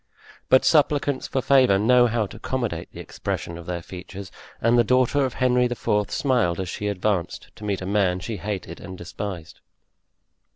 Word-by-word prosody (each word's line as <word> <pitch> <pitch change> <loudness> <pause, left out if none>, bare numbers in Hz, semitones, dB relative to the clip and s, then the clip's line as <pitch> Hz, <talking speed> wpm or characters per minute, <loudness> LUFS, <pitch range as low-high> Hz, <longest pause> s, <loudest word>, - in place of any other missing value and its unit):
But 130 - +5
supplicants 145 -3 +2
for 130 - -2
favor 130 -8 +5
know 120 +4 +5
how 115 -1 0
to 100 - -10
accommodate 110 -8 -3
the - - -11
expression 85 - -5
of 85 0 -10
their 85 -1 -4
features, 95 +1 -9 0.3
and 115 +1 +3
the 120 - +5
daughter 130 +4 +2
of 130 - -4
Henry 125 -1 +3
IV. 105 -4 0
smiled 120 - +1
as 95 -2 -3
she 105 - -4
advanced 100 -2 -2
to - - -12
meet 100 -2 -2
a - - -4
man 95 -2 +1
she 110 +4 -5
hated 95 -2 -5
and 95 -1 -9
despised. 85 -1 -7
105 Hz, 175 wpm, -24 LUFS, 95-125 Hz, 0.3 s, But